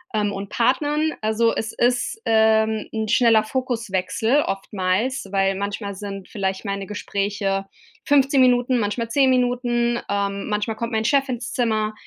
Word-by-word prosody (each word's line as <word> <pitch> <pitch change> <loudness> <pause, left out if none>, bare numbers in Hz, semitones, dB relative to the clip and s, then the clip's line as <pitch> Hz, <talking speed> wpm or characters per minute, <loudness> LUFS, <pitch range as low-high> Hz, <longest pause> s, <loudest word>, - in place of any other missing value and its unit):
ähm, 205 -1 +1
und 195 0 -6
Partnern. 295 +6 +1
Also, 220 +2 +2
es 220 0 -3
ist, 245 - 0
ähm, 220 -1 +3
'n 220 -1 -2
schneller 225 -1 +4
Fokuswechsel, 225 0 0
oftmals, 195 +5 -2
weil 195 0 +2
manchmal 200 +1 -4
sind 195 -1 -7
vielleicht 195 -1 -3
meine 200 -1 -3
Gespräche 200 -1 -2 0.4
15 275 -1 +4
Minuten, 250 0 +3
manchmal 225 +2 -2
10 265 +1 +3
Minuten, 245 -1 +1
ähm, 200 0 -2
manchmal 210 +1 -1
kommt 235 +1 -3
mein 220 -1 -1
Chef 275 -1 +2
ins 240 -1 -4
Zimmer 220 -3 0
220 Hz, 145 wpm, -22 LUFS, 200-245 Hz, 0.4 s, schneller